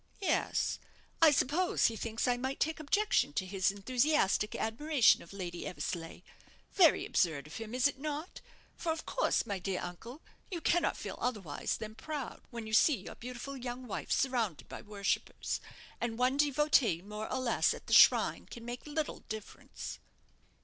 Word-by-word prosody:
"Yes. 390 Hz, -, 0 dB, 0.4 s
I 325 Hz, -, +9 dB
suppose 305 Hz, +5 st, +2 dB
he 230 Hz, -, +2 dB
thinks 225 Hz, +2 st, -2 dB
I 245 Hz, -, +3 dB
might 260 Hz, +3 st, -3 dB
take 320 Hz, +1 st, 0 dB
objection 310 Hz, -, +2 dB
to 185 Hz, -, -1 dB
his 190 Hz, 0 st, +1 dB
enthusiastic 235 Hz, +1 st, +1 dB
admiration 265 Hz, +3 st, +3 dB
of 170 Hz, -, -13 dB
Lady 180 Hz, -3 st, -5 dB
Eversleigh. 170 Hz, -1 st, -5 dB, 0.5 s
Very 350 Hz, -6 st, +5 dB
absurd 155 Hz, -6 st, +1 dB
of 155 Hz, -, -8 dB
him, 225 Hz, +1 st, -6 dB
is 255 Hz, -, +2 dB
it 285 Hz, -2 st, +2 dB
not? 305 Hz, +4 st, -5 dB, 0.3 s
For, 335 Hz, -, -2 dB
of 320 Hz, 0 st, -4 dB
course, -, -, +1 dB
my 200 Hz, -2 st, -3 dB
dear 185 Hz, 0 st, -2 dB
uncle, 230 Hz, -, -8 dB, 0.3 s
you 355 Hz, -, -3 dB
cannot 340 Hz, +1 st, +2 dB
feel -, -, -6 dB
otherwise 200 Hz, -12 st, -2 dB
than 215 Hz, 0 st, -7 dB
proud 280 Hz, +4 st, -6 dB
when 235 Hz, -2 st, -6 dB
you 220 Hz, -, -7 dB
see 285 Hz, +6 st, +6 dB
your -, -, -9 dB
beautiful 250 Hz, +3 st, -7 dB
young 250 Hz, 0 st, -5 dB
wife 220 Hz, -, -5 dB
surrounded 235 Hz, -, 0 dB
by -, -, -8 dB
worshippers; 205 Hz, -2 st, -2 dB, 0.4 s
and 230 Hz, -1 st, -2 dB
one 255 Hz, +2 st, +2 dB
devotee 280 Hz, -, +3 dB
more 210 Hz, +2 st, -6 dB
or -, -, 0 dB
less 255 Hz, -3 st, +2 dB
at -, -, -6 dB
the -, -, -2 dB
shrine -, -, +6 dB
can 235 Hz, -1 st, -10 dB
make 240 Hz, +4 st, -6 dB
little 300 Hz, +1 st, -2 dB
difference." 215 Hz, -1 st, -7 dB
245 Hz, 170 wpm, -32 LUFS, 205-290 Hz, 0.5 s, I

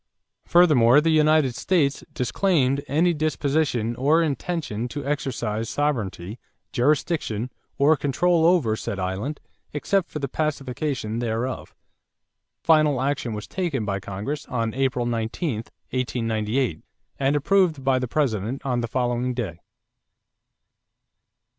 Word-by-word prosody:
Furthermore 145 Hz, -7 st, +6 dB
the 165 Hz, +2 st, +2 dB
United 155 Hz, -4 st, +4 dB
States 140 Hz, +3 st, +1 dB
disclaimed 140 Hz, -, +1 dB
"any 170 Hz, +4 st, +2 dB
disposition 145 Hz, -6 st, 0 dB
or 150 Hz, +6 st, +3 dB
intention 150 Hz, -7 st, -2 dB
to 145 Hz, +3 st, -6 dB
exercise 120 Hz, -6 st, -2 dB
sovereignty, 110 Hz, -7 st, -2 dB, 0.3 s
jurisdiction, 130 Hz, -, 0 dB, 0.3 s
or 145 Hz, +3 st, +5 dB
control 160 Hz, +4 st, +2 dB
over 155 Hz, -12 st, +3 dB
said 100 Hz, -, -4 dB
island 95 Hz, +11 st, -3 dB, 0.3 s
except 180 Hz, +5 st, 0 dB
for -, -, -5 dB
the 140 Hz, -2 st, -2 dB
pacification 135 Hz, -5 st, -2 dB
thereof." 120 Hz, +2 st, -3 dB, 0.9 s
Final 155 Hz, -4 st, +4 dB
action 135 Hz, -3 st, -1 dB
was 105 Hz, -, -6 dB
taken 165 Hz, -, -2 dB
by 100 Hz, -1 st, -1 dB
Congress 105 Hz, +11 st, -5 dB
on 115 Hz, -3 st, -2 dB
April 130 Hz, -2 st, 0 dB
19, 120 Hz, +4 st, -2 dB, 0.3 s
1898, 115 Hz, -, -1 dB, 0.4 s
and 140 Hz, +1 st, +2 dB
approved 160 Hz, -1 st, +2 dB
by 130 Hz, -1 st, +3 dB
the 125 Hz, -, -2 dB
President 120 Hz, -3 st, -1 dB
on 125 Hz, -3 st, 0 dB
the 120 Hz, -, -2 dB
following 125 Hz, +1 st, -1 dB
day. 95 Hz, -9 st, -4 dB
135 Hz, 115 wpm, -24 LUFS, 115-150 Hz, 0.9 s, Furthermore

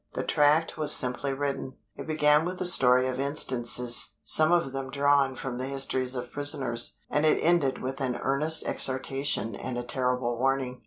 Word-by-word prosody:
The -, -, -4 dB
tract 150 Hz, +2 st, +1 dB
was 150 Hz, -1 st, +2 dB
simply 125 Hz, +2 st, -1 dB
written. 135 Hz, -1 st, -5 dB, 0.2 s
It -, -, -9 dB
began 150 Hz, -1 st, +2 dB
with 180 Hz, +2 st, -5 dB
a -, -, -3 dB
story 125 Hz, -7 st, +4 dB
of 130 Hz, 0 st, -4 dB
instances, 125 Hz, -4 st, +1 dB
some 155 Hz, +1 st, +3 dB
of 170 Hz, -6 st, +1 dB
them 135 Hz, 0 st, -6 dB
drawn 140 Hz, -1 st, +1 dB
from 125 Hz, -1 st, -6 dB
the 130 Hz, -, -4 dB
histories 135 Hz, -1 st, -2 dB
of 125 Hz, -1 st, -6 dB
prisoners, 135 Hz, -5 st, +1 dB
and 150 Hz, -, -1 dB
it 155 Hz, -, +3 dB
ended 160 Hz, -7 st, 0 dB
with 135 Hz, +2 st, -5 dB
an 125 Hz, -2 st, -2 dB
earnest 150 Hz, +4 st, 0 dB
exhortation 130 Hz, -4 st, -1 dB
and 125 Hz, +4 st, -6 dB
a 120 Hz, -, -4 dB
terrible 125 Hz, -1 st, -2 dB
warning. 130 Hz, -1 st, -2 dB
135 Hz, 175 wpm, -26 LUFS, 125-145 Hz, 0.2 s, story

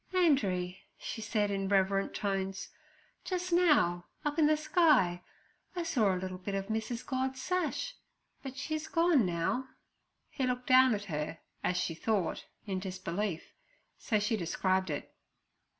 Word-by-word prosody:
'Andree' 195 Hz, -, +2 dB, 0.2 s
she 225 Hz, -, -6 dB
said, 215 Hz, -2 st, 0 dB
in 195 Hz, -1 st, -1 dB
reverent 195 Hz, 0 st, +2 dB
tones, 195 Hz, -1 st, -2 dB, 0.5 s
'just 360 Hz, -1 st, -2 dB
now, 290 Hz, -, +4 dB, 0.2 s
up 295 Hz, +2 st, 0 dB
in 305 Hz, -, +6 dB
the 305 Hz, 0 st, +4 dB
sky, 300 Hz, -, +3 dB, 0.5 s
I 350 Hz, -, -1 dB
saw 230 Hz, -11 st, +2 dB
a 185 Hz, -, 0 dB
little 185 Hz, 0 st, -5 dB
bit 195 Hz, +2 st, -4 dB
of 195 Hz, +1 st, -3 dB
Mrs. 220 Hz, +2 st, -2 dB
God's 260 Hz, 0 st, -2 dB
sash, 365 Hz, -, -1 dB, 0.5 s
but 270 Hz, -1 st, -7 dB
she's 310 Hz, +2 st, -3 dB
gone 330 Hz, -, +3 dB
now.' 175 Hz, +10 st, -1 dB, 0.6 s
He 265 Hz, -3 st, -1 dB
looked 250 Hz, 0 st, -2 dB
down 255 Hz, -2 st, +6 dB
at 205 Hz, -, -5 dB
her, 155 Hz, -2 st, -3 dB, 0.3 s
as 180 Hz, -, +1 dB
she 165 Hz, -, 0 dB
thought, 195 Hz, +1 st, -1 dB, 0.2 s
in 190 Hz, -3 st, -2 dB
disbelief, 185 Hz, -1 st, -4 dB, 0.5 s
so 215 Hz, -, +1 dB
she 210 Hz, +2 st, +1 dB
described 185 Hz, 0 st, 0 dB
it. 145 Hz, -, -4 dB
210 Hz, 150 wpm, -32 LUFS, 185-280 Hz, 0.6 s, in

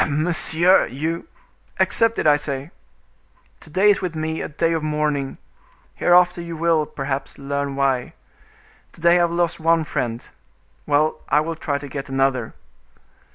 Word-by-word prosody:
"Monsieur! 165 Hz, +4 st, +3 dB
you—" 160 Hz, -, -4 dB, 0.5 s
"Accept 230 Hz, 0 st, +3 dB
it, -, -, -1 dB
I 150 Hz, -1 st, +6 dB
say. 145 Hz, +1 st, -4 dB, 0.9 s
To -, -, -12 dB
day 195 Hz, +6 st, +4 dB
is 200 Hz, -, 0 dB
with 180 Hz, -3 st, -4 dB
me 160 Hz, 0 st, -3 dB
a -, -, -5 dB
day 165 Hz, +2 st, 0 dB
of 165 Hz, -, -1 dB
mourning; 150 Hz, -2 st, -2 dB, 0.6 s
hereafter 175 Hz, 0 st, +3 dB
you 170 Hz, -1 st, -7 dB
will, 160 Hz, -2 st, +1 dB
perhaps, 135 Hz, 0 st, -5 dB
learn 140 Hz, 0 st, -3 dB
why; 135 Hz, -3 st, 0 dB, 0.8 s
to -, -, -15 dB
day 170 Hz, +1 st, +5 dB
I -, -, +3 dB
have 170 Hz, -1 st, +1 dB
lost 170 Hz, 0 st, 0 dB
one 165 Hz, 0 st, +2 dB
friend; 120 Hz, -5 st, -4 dB, 0.6 s
well, 150 Hz, +1 st, +1 dB
I 150 Hz, -, +4 dB
will 165 Hz, +1 st, -4 dB
try 145 Hz, -3 st, -2 dB
to 145 Hz, -, -8 dB
get 140 Hz, 0 st, -6 dB
another." 135 Hz, -3 st, 0 dB
155 Hz, 155 wpm, -21 LUFS, 140-170 Hz, 0.9 s, I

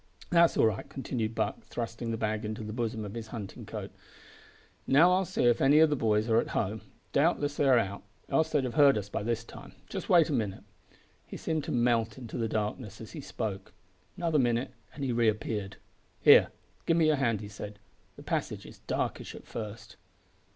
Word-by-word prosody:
"That's 170 Hz, -1 st, +5 dB
all -, -, +5 dB
right," 110 Hz, -2 st, -1 dB
continued 115 Hz, -4 st, -3 dB
Buck, -, -, -1 dB
thrusting 115 Hz, 0 st, -5 dB
the 115 Hz, -, -1 dB
bag 110 Hz, 0 st, -1 dB
into 110 Hz, +1 st, -4 dB
the 105 Hz, 0 st, -6 dB
bosom 115 Hz, -2 st, -2 dB
of 100 Hz, -, -7 dB
his 115 Hz, -1 st, -6 dB
hunting 110 Hz, -4 st, -8 dB
coat; -, -, -6 dB, 1.0 s
"now 160 Hz, +7 st, +6 dB
I'll 185 Hz, +1 st, +2 dB
see 185 Hz, -, -1 dB
if 120 Hz, -1 st, +4 dB
any 140 Hz, +3 st, +6 dB
o' 160 Hz, -, +8 dB
the 150 Hz, -2 st, 0 dB
boys 110 Hz, -3 st, +1 dB
are 115 Hz, -1 st, +4 dB
at -, -, -1 dB
home. 105 Hz, +2 st, -1 dB, 0.3 s
Doubtless 145 Hz, -1 st, +2 dB
they 145 Hz, -, +2 dB
are 130 Hz, -, +6 dB
out 100 Hz, -3 st, -1 dB, 0.3 s
else 160 Hz, 0 st, +2 dB
they'd 145 Hz, -3 st, +1 dB
have 125 Hz, -2 st, -3 dB
heard 140 Hz, -5 st, +6 dB
us 105 Hz, -1 st, -4 dB
by -, -, -3 dB
this 115 Hz, +2 st, -1 dB
time. -, -, -12 dB
Just -, -, -6 dB
wait 170 Hz, -3 st, +6 dB
a 155 Hz, -, -2 dB
minute." 105 Hz, -7 st, -2 dB, 0.6 s
He -, -, -7 dB
seemed 160 Hz, -2 st, -2 dB
to -, -, -4 dB
melt 120 Hz, -2 st, +1 dB
into 120 Hz, -4 st, -8 dB
the 115 Hz, -1 st, -1 dB
darkness 105 Hz, 0 st, -3 dB
as 110 Hz, -, -9 dB
he 155 Hz, -, -7 dB
spoke. 110 Hz, -7 st, -5 dB, 0.4 s
Another 165 Hz, -4 st, +1 dB
minute 120 Hz, 0 st, +1 dB, 0.2 s
and 140 Hz, -, -5 dB
he 130 Hz, -, 0 dB
re 115 Hz, -1 st, +3 dB
appeared. 105 Hz, -2 st, -3 dB, 0.4 s
"Here, -, -, +8 dB, 0.4 s
give 165 Hz, -, +3 dB
me 165 Hz, -, +4 dB
your 155 Hz, -1 st, +3 dB
hand," 115 Hz, -6 st, +1 dB
he 105 Hz, -, -7 dB
said; 105 Hz, 0 st, -8 dB, 0.4 s
"the -, -, -12 dB
passage -, -, -3 dB
is -, -, -13 dB
darkish -, -, -2 dB
at -, -, -11 dB
first." 110 Hz, -2 st, -7 dB
115 Hz, 205 wpm, -29 LUFS, 110-140 Hz, 1.0 s, o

